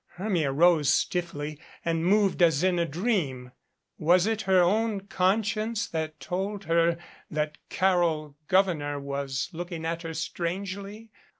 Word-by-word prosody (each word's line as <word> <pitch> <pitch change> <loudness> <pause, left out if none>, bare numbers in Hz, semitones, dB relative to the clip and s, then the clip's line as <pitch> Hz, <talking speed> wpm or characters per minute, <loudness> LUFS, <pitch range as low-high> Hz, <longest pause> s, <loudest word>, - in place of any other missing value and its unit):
Hermia 180 -7 0
rose 155 0 +4
stiffly 155 -4 -1 0.3
and 165 -1 0
moved 195 0 +3
as 165 -2 +4
in 185 -2 +2
a 170 - +1
dream. 150 - -1 0.5
Was 175 +4 +4
it 220 0 0
her 190 -1 +6
own 205 +3 +2
conscience 215 +4 0
that 160 -1 -4
told 195 +3 -3
her 170 -1 +2 0.3
that 150 -1 -2
Carol 170 -6 +1
Gouverneur 170 -7 +2
was 140 -2 -3
looking 170 -1 -5
at 165 +1 -2
her 165 -1 -6
strangely? 195 +7 -4
175 Hz, 130 wpm, -27 LUFS, 155-195 Hz, 0.5 s, her